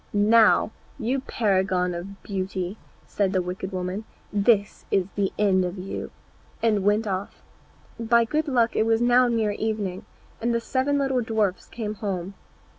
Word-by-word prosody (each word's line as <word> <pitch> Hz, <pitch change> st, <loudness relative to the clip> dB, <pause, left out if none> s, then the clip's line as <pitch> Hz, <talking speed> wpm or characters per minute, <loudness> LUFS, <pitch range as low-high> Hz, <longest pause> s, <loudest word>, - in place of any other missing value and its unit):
"Now, 215 Hz, +1 st, +5 dB, 0.3 s
you 250 Hz, +4 st, 0 dB
paragon 190 Hz, -7 st, +1 dB
of 190 Hz, +3 st, -8 dB
beauty," 190 Hz, 0 st, -3 dB, 0.3 s
said 200 Hz, -1 st, 0 dB
the 185 Hz, -, +2 dB
wicked 185 Hz, +2 st, -5 dB
woman, 185 Hz, +3 st, -3 dB, 0.3 s
"this 205 Hz, 0 st, +2 dB
is 190 Hz, -2 st, +2 dB
the 200 Hz, -2 st, 0 dB
end 195 Hz, -3 st, +3 dB
of 180 Hz, +2 st, -3 dB
you," 185 Hz, +1 st, -5 dB, 0.5 s
and 210 Hz, -4 st, +2 dB
went 210 Hz, +2 st, +2 dB
off. 195 Hz, -1 st, -4 dB, 0.6 s
By 230 Hz, 0 st, +3 dB
good 305 Hz, +6 st, -1 dB
luck 240 Hz, -4 st, +2 dB
it 220 Hz, -, +2 dB
was 225 Hz, 0 st, +3 dB
now 245 Hz, +1 st, +5 dB
near 225 Hz, -3 st, +1 dB
evening, 205 Hz, -3 st, -3 dB, 0.4 s
and 235 Hz, +1 st, +1 dB
the -, -, +2 dB
seven 265 Hz, +4 st, 0 dB
little 270 Hz, -2 st, +1 dB
dwarfs 220 Hz, -5 st, -1 dB
came 215 Hz, -3 st, -4 dB
home. 195 Hz, -3 st, -4 dB
210 Hz, 155 wpm, -25 LUFS, 190-230 Hz, 0.6 s, Now